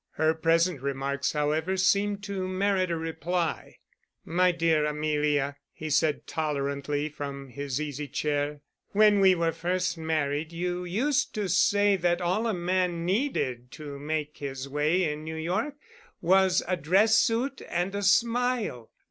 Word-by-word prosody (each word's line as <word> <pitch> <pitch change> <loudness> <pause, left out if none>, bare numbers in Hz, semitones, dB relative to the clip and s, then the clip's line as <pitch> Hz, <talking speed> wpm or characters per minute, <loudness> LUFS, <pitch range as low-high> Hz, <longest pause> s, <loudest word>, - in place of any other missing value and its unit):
Her 160 0 +2
present 165 -1 +2
remarks, 140 0 -2
however, 155 +5 0
seemed 200 +2 +2
to 195 -2 -3
merit 185 0 +1
a 170 - -1
reply. 165 +1 -3 0.5
"My 180 +2 +3
dear 165 -3 +2
Amelia," 150 -2 0
he 155 -1 -6
said, 150 +1 +1
tolerantly, 145 -1 -2
from 140 -2 -7
his 140 +1 -4
easy 150 -1 -4
chair, 145 +1 -2 0.3
"when 210 0 +5
we 190 -1 +6
were 165 -1 +1
first 175 +1 -1
married 155 -1 -1
you 180 +1 -3
used 245 +10 0
to 210 -2 -1
say 200 +3 +3
that 175 -1 +1
all 185 +6 0
a 225 - 0
man 175 -1 0
needed 175 - -1
to 145 -2 -8
make 150 0 -3
his 135 -1 -5
way 150 +6 +1
in 150 -2 -2
New 160 0 -5
York 180 - -2 0.4
was 190 +1 +3
a 185 - +1
dress 195 +7 +4
suit 250 +4 0
and 175 +3 -1
a 200 - -2
smile. 230 - +1
165 Hz, 150 wpm, -27 LUFS, 150-190 Hz, 0.5 s, we